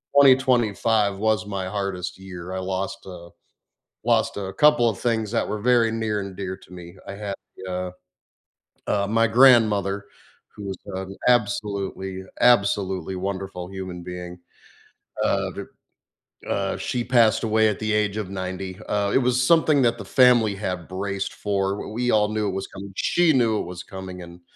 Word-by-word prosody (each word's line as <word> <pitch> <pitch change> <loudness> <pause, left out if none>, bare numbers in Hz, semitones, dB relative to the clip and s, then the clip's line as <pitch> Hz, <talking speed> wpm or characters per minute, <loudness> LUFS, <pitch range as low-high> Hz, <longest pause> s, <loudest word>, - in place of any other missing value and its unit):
2025 120 -6 +4
was 110 -1 +1
my 100 -2 -4
hardest 95 -2 -4
year. 95 -1 -8
I 95 - -2
lost 95 +1 -4
a 85 -2 -10 0.7
lost - - +1
a 95 -1 -4
couple 150 0 +5
of 105 - -4
things 110 -3 0
that 115 - 0
were 105 - -3
very 120 -1 +3
near 110 -2 -1
and 100 -1 -6
dear 95 -1 -5
to 90 - -17
me, 85 0 -10
I 100 - -5
had, 100 -1 -5 0.3
uh 90 0 -3 1.0
Uh, 100 -1 +1
my 115 +2 +3
grandmother, 110 -5 +4 0.5
who 105 - -9
was 95 -2 -5
an 95 0 -6
absolutely, 100 -4 0 0.2
absolutely 95 -6 +2
wonderful 95 -1 -4
human 95 -2 -7
being, 90 0 -7 0.9
uh, - - 0
v - - -6 0.9
uh, 100 -1 -1
she 125 -1 -2
passed 115 -3 +3
away 110 0 +3
at 105 - -3
the 110 -1 -1
age 105 -1 +1
of 105 -4 -4
90. 95 0 -4 0.2
Uh, 100 -1 +1
it - - +5
was 125 -1 +1 0.2
something 155 -4 +5
that 120 -1 +2
the 105 - -8
family 120 -4 +4
had 90 -4 -4
braced 100 +1 -3
for, 100 -1 -1 0.2
we - - -6 0.2
we - - +3
all 105 -1 +3
knew 110 -1 0
it 95 - -2
was - - -7
coming, 95 +1 -9
she 175 -2 +3
knew 115 -5 +2
it - - -5
was 90 - -8
coming, 95 -1 -8
and 85 +1 -14
100 Hz, 170 wpm, -24 LUFS, 95-110 Hz, 1.0 s, couple